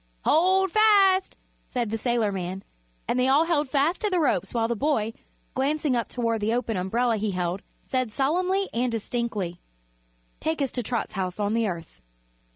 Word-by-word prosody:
"Hold 375 Hz, +3 st, +3 dB
fast!" 395 Hz, -3 st, +4 dB, 0.3 s
said 240 Hz, -4 st, -2 dB
the 225 Hz, -, -1 dB
sailorman, 200 Hz, -6 st, -1 dB, 0.4 s
and 250 Hz, -, 0 dB
they 250 Hz, -, +3 dB
all 285 Hz, +5 st, +4 dB
held 300 Hz, -5 st, +1 dB
fast 295 Hz, +5 st, +1 dB
to 425 Hz, -, +1 dB
the 365 Hz, -2 st, +1 dB
ropes 295 Hz, -5 st, +1 dB
while 230 Hz, -2 st, +1 dB
the 235 Hz, -, -1 dB
boy, 225 Hz, -4 st, 0 dB, 0.4 s
glancing 285 Hz, 0 st, 0 dB
up 235 Hz, -, -1 dB
toward 230 Hz, -3 st, -1 dB
the 220 Hz, +3 st, +1 dB
open 235 Hz, -2 st, -1 dB
umbrella 225 Hz, +6 st, +1 dB
he 215 Hz, +1 st, -1 dB
held, 180 Hz, 0 st, -2 dB, 0.3 s
said 255 Hz, -3 st, -1 dB
solemnly 365 Hz, -, +1 dB
and 245 Hz, +1 st, 0 dB
distinctly: 220 Hz, -6 st, -3 dB, 0.8 s
"Take 320 Hz, 0 st, -1 dB
us 275 Hz, -3 st, 0 dB
to 250 Hz, -, -2 dB
Trot's 235 Hz, 0 st, -3 dB
house 185 Hz, -1 st, -3 dB
on 205 Hz, 0 st, 0 dB
the 230 Hz, -1 st, +1 dB
Earth." 170 Hz, -4 st, -7 dB
240 Hz, 170 wpm, -26 LUFS, 215-305 Hz, 0.8 s, fast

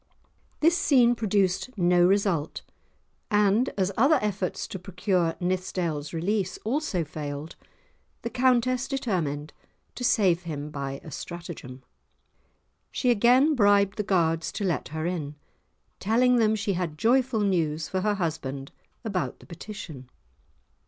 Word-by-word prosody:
This 330 Hz, +3 st, +5 dB
scene 250 Hz, -8 st, +4 dB
produced 210 Hz, +1 st, 0 dB
no 175 Hz, -1 st, +4 dB
result, 190 Hz, -6 st, 0 dB, 0.7 s
and 210 Hz, +3 st, +3 dB
as 190 Hz, -1 st, +1 dB
other 285 Hz, +6 st, +4 dB
efforts 195 Hz, -3 st, -2 dB
to 190 Hz, -, -6 dB
procure 180 Hz, -2 st, 0 dB
Nithsdale's 175 Hz, -5 st, -2 dB
release 185 Hz, +3 st, -1 dB
also 225 Hz, -, 0 dB
failed, 150 Hz, 0 st, -6 dB, 0.7 s
the 235 Hz, -, -3 dB
Countess 255 Hz, 0 st, +2 dB
determined 165 Hz, -, -2 dB, 0.4 s
to 250 Hz, -, -7 dB
save 185 Hz, -7 st, +3 dB
him 150 Hz, -3 st, -6 dB
by 140 Hz, -1 st, -4 dB
a 155 Hz, -, -10 dB
stratagem. 150 Hz, -6 st, -8 dB, 1.1 s
She 250 Hz, -, +1 dB
again 250 Hz, +7 st, +4 dB
bribed 205 Hz, -4 st, +3 dB
the -, -, +1 dB
guards 165 Hz, -4 st, +1 dB
to 210 Hz, -, -4 dB
let 175 Hz, -5 st, -1 dB
her 155 Hz, +1 st, -4 dB
in, 155 Hz, -5 st, -3 dB, 0.6 s
telling 245 Hz, +4 st, +3 dB
them 220 Hz, -2 st, +3 dB
she 205 Hz, -1 st, -1 dB
had 175 Hz, -4 st, -3 dB
joyful 245 Hz, -, +2 dB
news 165 Hz, -6 st, 0 dB
for 185 Hz, -, -2 dB
her 210 Hz, +1 st, +1 dB
husband 150 Hz, -7 st, -4 dB, 0.3 s
about 195 Hz, -5 st, -2 dB
the -, -, -16 dB
petition. 170 Hz, -, -9 dB
190 Hz, 130 wpm, -26 LUFS, 160-220 Hz, 1.1 s, This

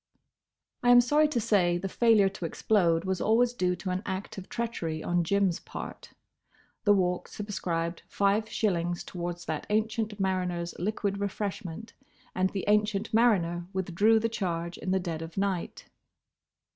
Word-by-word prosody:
I 245 Hz, -, +2 dB
am 245 Hz, 0 st, +9 dB
sorry 295 Hz, +5 st, +4 dB
to 295 Hz, -5 st, -1 dB
say 180 Hz, -5 st, +2 dB
the 195 Hz, -, -3 dB
failure 220 Hz, -1 st, +4 dB
to 190 Hz, -3 st, -5 dB
explode 170 Hz, -1 st, +2 dB
was 190 Hz, -1 st, -1 dB
always 235 Hz, +3 st, +3 dB
due 180 Hz, -6 st, 0 dB
to 185 Hz, +1 st, -4 dB
an 180 Hz, +1 st, -1 dB
act 190 Hz, +1 st, -5 dB
of 185 Hz, -, -11 dB
treachery 175 Hz, -10 st, -3 dB
on 175 Hz, 0 st, +1 dB
Jim's 195 Hz, 0 st, +1 dB
part. -, -, -8 dB, 0.8 s
The 205 Hz, -, +6 dB
Walk 180 Hz, -2 st, 0 dB
subscribed 170 Hz, -5 st, -3 dB
five 205 Hz, +2 st, +1 dB
shillings 175 Hz, -6 st, 0 dB
towards 175 Hz, -1 st, -5 dB
that 155 Hz, -1 st, -4 dB
ancient 215 Hz, 0 st, -1 dB
mariner's 180 Hz, -3 st, -1 dB
liquid 200 Hz, +1 st, -1 dB
refreshment, 200 Hz, 0 st, -4 dB, 0.4 s
and 185 Hz, 0 st, +1 dB
the 195 Hz, -1 st, -4 dB
ancient 210 Hz, +1 st, +1 dB
mariner 175 Hz, -7 st, +2 dB
withdrew 190 Hz, +4 st, +3 dB
the 225 Hz, -, +1 dB
charge 170 Hz, -6 st, -3 dB
in -, -, -4 dB
the 190 Hz, 0 st, +2 dB
dead 170 Hz, -3 st, -4 dB
of 165 Hz, +2 st, -8 dB
night. 195 Hz, -3 st, -2 dB
190 Hz, 155 wpm, -28 LUFS, 175-215 Hz, 0.8 s, am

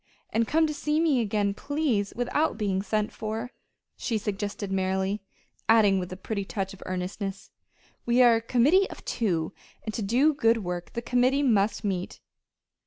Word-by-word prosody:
And 225 Hz, 0 st, +1 dB
come 320 Hz, +1 st, +3 dB
to 305 Hz, -, -2 dB
see 300 Hz, +1 st, 0 dB
me 305 Hz, -7 st, +3 dB
again, 205 Hz, -2 st, 0 dB
please 275 Hz, -6 st, -1 dB
without 245 Hz, +5 st, 0 dB
being 195 Hz, -3 st, 0 dB
sent 210 Hz, +1 st, -1 dB
for," 220 Hz, +3 st, -4 dB, 0.4 s
she 230 Hz, -, -1 dB
suggested 205 Hz, -1 st, -4 dB
merrily, 190 Hz, +1 st, 0 dB, 0.5 s
adding 210 Hz, -4 st, +5 dB
with 180 Hz, 0 st, -5 dB
a 185 Hz, -, -6 dB
pretty 200 Hz, +1 st, -3 dB
touch 195 Hz, 0 st, -4 dB
of 195 Hz, -, -14 dB
earnestness: 190 Hz, +2 st, -4 dB, 0.5 s
"We 240 Hz, +1 st, +4 dB
are 235 Hz, -2 st, +6 dB
a -, -, -3 dB
committee 280 Hz, +12 st, +3 dB
of -, -, -11 dB
two; 180 Hz, -7 st, -1 dB, 0.3 s
and 220 Hz, -, -4 dB
to 225 Hz, -, -3 dB
do 250 Hz, +10 st, +3 dB
good 230 Hz, -6 st, +2 dB
work 175 Hz, -1 st, -5 dB
the 235 Hz, -, -4 dB
committee 255 Hz, +4 st, +2 dB
must 215 Hz, -4 st, +2 dB
meet!" 190 Hz, -3 st, -3 dB
215 Hz, 170 wpm, -27 LUFS, 195-245 Hz, 0.5 s, are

